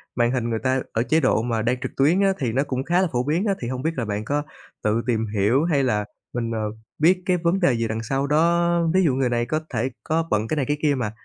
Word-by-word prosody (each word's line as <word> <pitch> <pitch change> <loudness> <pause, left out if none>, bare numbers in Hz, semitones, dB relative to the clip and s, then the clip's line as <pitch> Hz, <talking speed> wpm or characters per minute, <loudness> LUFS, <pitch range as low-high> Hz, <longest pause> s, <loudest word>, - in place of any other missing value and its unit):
màn 120 -1 +2
hình 125 -2 -1
người 115 -1 -1
ta 130 0 +2
ở 115 - +1
chế 140 +7 +2
độ 130 -6 +2
mà 115 -1 -1
đang 120 +3 0
trực 130 - -4
tuyến 150 +7 +4
á, 195 -1 +3
thì 125 -4 -1
nó 135 +5 +1
cũng 130 -2 -3
khá 175 +5 +2
là 190 - +2
phổ 125 -1 0
biến 160 - 0
á. 200 - +2
Thì 120 - -3
không 130 0 -3
biết 160 - 0
là 120 - -1
bạn 105 0 -3
có 145 +4 -1 0.4
tự 110 +2 +1
tìm 115 -2 +1
hiểu 105 +7 +2
hay 150 -5 +2
là 105 -5 0 0.3
mình, 115 -1 -2
ờ, 115 - -2 0.4
biết 180 +4 +4
cái 180 -1 +2
vấn 170 +2 +1
đề 155 -9 +3
gì 115 0 -1
đằng 110 +1 -3
sau 135 +5 -1
đó, 170 +3 +3
ví 190 0 +4
dụ 145 - +3
người 130 -1 +1
này 120 0 0
có 155 +5 -1
thể 120 +4 0
có 165 +1 0
bận 105 +1 +1
cái 155 - -2
này 140 - +1
cái 145 - 0
kia 145 -2 +2
mà. 120 -5 -2
130 Hz, 290 wpm, -23 LUFS, 115-160 Hz, 0.4 s, tuyến